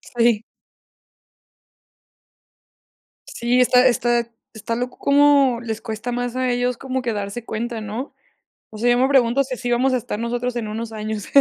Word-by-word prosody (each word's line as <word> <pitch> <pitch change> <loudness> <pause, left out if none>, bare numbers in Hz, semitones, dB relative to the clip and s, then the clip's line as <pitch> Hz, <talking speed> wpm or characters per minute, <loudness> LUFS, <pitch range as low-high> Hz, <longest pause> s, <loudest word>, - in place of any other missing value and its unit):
Sí. 230 -2 +3 2.9
Sí, 245 +1 0
está 250 +1 +5
está 240 -1 +1 0.3
está 225 +1 -4
loco 250 +1 -4
como 280 -3 +4
les 225 -2 -5
cuesta 225 +2 -5
más 245 0 -3
a 255 0 0
ellos 245 0 0
como 260 0 -3
que 240 -2 -2
darse 205 +3 -5
cuenta, 230 0 -4
¿no? 220 +6 -6 0.6
O 215 - -11
sea, 240 +3 +1
yo 245 - +3
me 260 - +3
pregunto 270 -1 +3
si 260 - -6
así 245 0 -3
vamos 255 +2 +2
a - - +3
estar 210 -2 -5
nosotros 245 +1 -2
en 225 -3 -3
unos 225 +1 -5
años. 215 -1 -5
240 Hz, 165 wpm, -21 LUFS, 225-250 Hz, 2.9 s, está